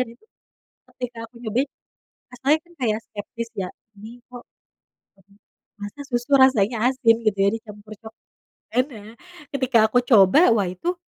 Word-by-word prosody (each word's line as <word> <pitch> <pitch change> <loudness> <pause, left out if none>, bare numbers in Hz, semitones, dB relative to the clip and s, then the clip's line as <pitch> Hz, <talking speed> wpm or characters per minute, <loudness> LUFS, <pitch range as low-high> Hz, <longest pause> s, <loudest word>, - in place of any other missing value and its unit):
dan 255 - -1
itu, 255 - -28 0.6
ketika 250 -2 -7
aku 230 - -14
nyobain, 245 +5 -1 0.6
rasanya 270 +5 +2
kan 345 - -21
kayak 220 -4 0
skeptis 230 +2 -7
ya, 185 - -3 0.3
ini 205 +2 -11 0.2
kok 245 -1 -10 1.4
masa 205 +7 -8
susu 245 +2 -3
rasanya 255 -5 +4
asin, 250 -4 +3
gitu 200 -2 +1
ya, 200 - +4
dicampur 215 -2 -10
cokelat 220 0 -15 0.4
kan. 250 +2 +3
Nah, 220 -4 -12 0.4
ketika 260 -3 +1
aku 245 - +2
coba, 245 - +5
wah 200 -4 +1
itu, 340 - -3
230 Hz, 145 wpm, -23 LUFS, 215-255 Hz, 1.4 s, coba